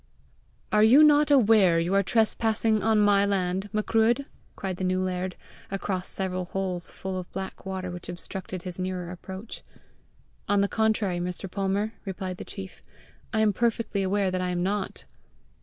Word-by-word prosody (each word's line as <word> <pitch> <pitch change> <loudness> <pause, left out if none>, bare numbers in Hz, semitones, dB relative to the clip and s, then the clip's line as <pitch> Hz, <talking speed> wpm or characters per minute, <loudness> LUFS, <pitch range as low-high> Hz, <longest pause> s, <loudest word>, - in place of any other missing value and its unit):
"Are 210 - +4
you 245 +8 +8
not 295 0 +5
aware 215 -10 +5
you 170 +3 0
are 200 - +5
trespassing 220 +1 +1
on 220 -1 +3
my 205 -1 +4
land, 195 0 0
Macruadh?" 225 +4 +2 0.3
cried 190 -2 -4
the 190 - -4
new 185 0 +1
laird, 185 0 -2 0.3
across 190 -1 -3
several 185 -1 -3
holes 180 -1 -1
full 190 -1 -5
of 180 - -9
black 190 0 -6
water 185 -1 -4
which 175 0 -8
obstructed 185 0 -6
his 180 -1 -5
nearer 185 -1 -3
approach. 190 +4 -8 0.9
"On 200 0 +4
the 200 - +2
contrary, 215 -4 +1
Mr. 180 +2 -4
Palmer," 200 +3 -1
replied 190 -2 -5
the - - -6
chief, 190 -2 -9 0.5
"I 220 - +1
am 215 -1 +3
perfectly 230 -1 0
aware 195 0 +1
that 185 0 -1
I 180 - -1
am 175 0 -1
not!" 195 +1 -2
195 Hz, 165 wpm, -27 LUFS, 185-215 Hz, 0.9 s, you